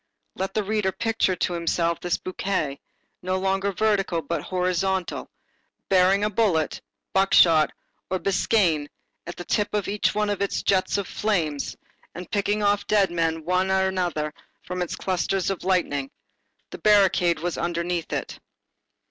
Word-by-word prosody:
Let 190 +1 -4
the 215 - +1
reader 210 -1 0
picture 225 -3 0
to 180 - -1
himself 170 0 0
this 175 - -1
bouquet, 185 -6 -2 0.4
no 185 +1 -1
longer 195 +1 0
vertical 195 -5 +1
but 155 +1 -2
horizontal, 185 +1 -1 0.6
bearing 190 +1 +4
a 210 - +2
bullet, 185 -8 +1 0.3
buckshot 170 -5 +5 0.4
or 185 - 0
a - - -10
biscaïen 180 -6 +1 0.4
at 175 - -6
the 175 - -8
tip 210 +3 0
of 205 - -1
each 205 0 0
one 210 -1 +1
of 200 - -3
its 200 - -1
jets 190 0 +2
of 200 - -2
flame, 170 -9 0 0.6
and 180 +1 -8
picking 205 +1 0
off 205 0 +1
dead 205 -3 +3
men 165 -2 -1
one 185 +2 +1
after 190 0 +2
another 170 -5 -2 0.3
from 180 0 -4
its 175 - -2
clusters 185 +1 -1
of 195 - -5
lightning. 160 -7 0 0.6
The - - -8
barricade 195 -5 +4
was 175 +2 -3
underneath 170 0 -2
it. - - -4
185 Hz, 155 wpm, -24 LUFS, 170-200 Hz, 0.6 s, buckshot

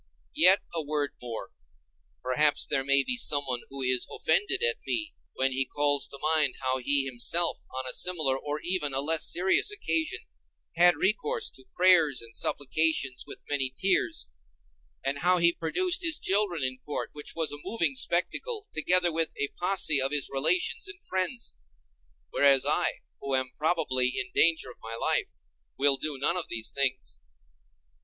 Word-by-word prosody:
Yet 185 +4 +5
a 165 - -2
word 145 -1 -2
more. 120 -2 -7 0.7
Perhaps 145 +4 +2
there 135 -2 0
may 140 0 +4
be 250 - -1
someone 140 - +1
who 135 0 -5
is 125 -1 0
offended 385 +1 0
at 475 -1 +1
me, 320 -1 -2 0.2
when 135 0 +1
he 135 +1 +1
calls 145 +1 +1
to 140 - -9
mind 155 -3 +1
how 130 0 -1
he 140 +2 +2
himself, 140 +7 -1
on 130 0 -5
a 125 - -2
similar 155 -7 +1
or 145 +2 -4
even 170 -6 -1
a - - +1
less 155 +3 +2
serious 190 - +2
occasion, 375 -3 -1 0.5
had 175 +1 +6
recourse 440 - 0
to - - -13
prayers 165 -7 +4
and 115 0 -8
supplications 145 -2 0
with - - -10
many 135 -3 -1
tears, 185 - 0 0.8
and 135 +1 -1
how 180 +1 +4
he 170 0 +4
produced 355 - 0
his 330 -2 +3
children 195 -6 0
in 130 0 -2
court, 145 - -5
which 150 0 -8
was 160 -2 -1
a 145 0 -7
moving 170 -11 0
spectacle, 410 - -1
together 175 +2 +2
with 165 0 0
a 140 - -1
posse 175 -6 +2
of 135 +1 0
his 145 -2 -1
relations 255 - +1
and 395 -2 -10
friends; 190 +6 -3 0.8
whereas 140 -2 +4
I, - - 0 0.2
who 135 -1 -1
am 130 -1 -1
probably 150 -6 +1
in 125 - -5
danger 160 -6 +2
of - - -16
my 115 0 -7
life, - - -1 0.4
will 140 0 +3
do 145 +1 -3
none 150 +6 0
of 175 - -5
these 115 -1 -3
things. 130 - -2
150 Hz, 165 wpm, -27 LUFS, 135-180 Hz, 0.8 s, had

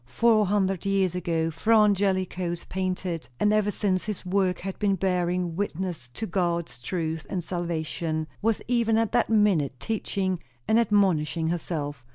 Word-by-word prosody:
Four 215 - +3
hundred 195 -2 +1
years 195 -3 +2
ago, 165 -2 -1
Fra 220 +8 +3
Angelico 190 -4 +2
painted; 180 -6 -3
and 210 0 +3
ever 215 -1 +2
since 190 -2 0
his 210 -3 -4
work 185 -1 +1
had 195 0 -5
been 200 -2 +2
bearing 180 -2 0
witness 180 -7 -3
to 220 - -3
God's 170 - -1
truth 160 +2 -3
and 180 -2 -2
salvation; 165 -2 -2 0.2
was 225 0 +1
even 230 -2 +2
at 225 -1 +1
that 240 - +2
minute 195 - +2
teaching 190 - -2 0.3
and 220 +1 +4
admonishing 175 -8 +2
herself. 150 -6 -3
185 Hz, 150 wpm, -26 LUFS, 170-205 Hz, 0.3 s, and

